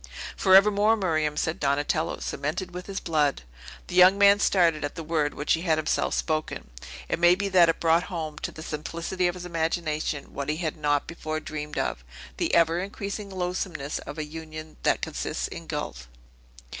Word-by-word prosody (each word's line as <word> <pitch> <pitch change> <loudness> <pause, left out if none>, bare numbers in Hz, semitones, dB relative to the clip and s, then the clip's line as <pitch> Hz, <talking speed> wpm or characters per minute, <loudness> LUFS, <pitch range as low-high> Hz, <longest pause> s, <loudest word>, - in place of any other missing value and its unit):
"For 190 - +5
evermore, 210 +3 +5
Miriam!" 155 -6 0
said 160 +2 -1
Donatello; 145 +3 0
"cemented 160 +6 -3
with 180 0 -7
his 195 -1 -3
blood!" 150 - 0 0.4
The - - -9
young 185 +2 +7
man 200 0 +6
started 170 -7 +3
at 145 - -3
the 165 - -5
word 155 -2 0
which 145 - +1
he 165 - 0
had 165 -3 +2
himself 155 0 0
spoken; 155 - -2 0.4
it - - -1
may 175 +1 +6
be 200 +1 -2
that 180 -3 +6
it 165 - 0
brought 165 +1 +3
home, 160 -5 -5
to - - -4
the 155 - -9
simplicity 170 +4 -2
of 175 - -2
his 180 -1 -7
imagination, 160 -3 -2
what 140 0 -4
he 155 - 0
had 160 -3 -2
not 145 -2 +1
before 155 -2 -4
dreamed 150 -1 -6
of, - - -2 0.3
the - - 0
ever 170 0 +4
increasing 200 +1 -5
loathsomeness 180 -5 -3
of - - -8
a 155 - -2
union 155 0 -9
that - - +1
consists - - -3
in - - -9
guilt. 60 0 -5
165 Hz, 185 wpm, -26 LUFS, 155-180 Hz, 0.4 s, young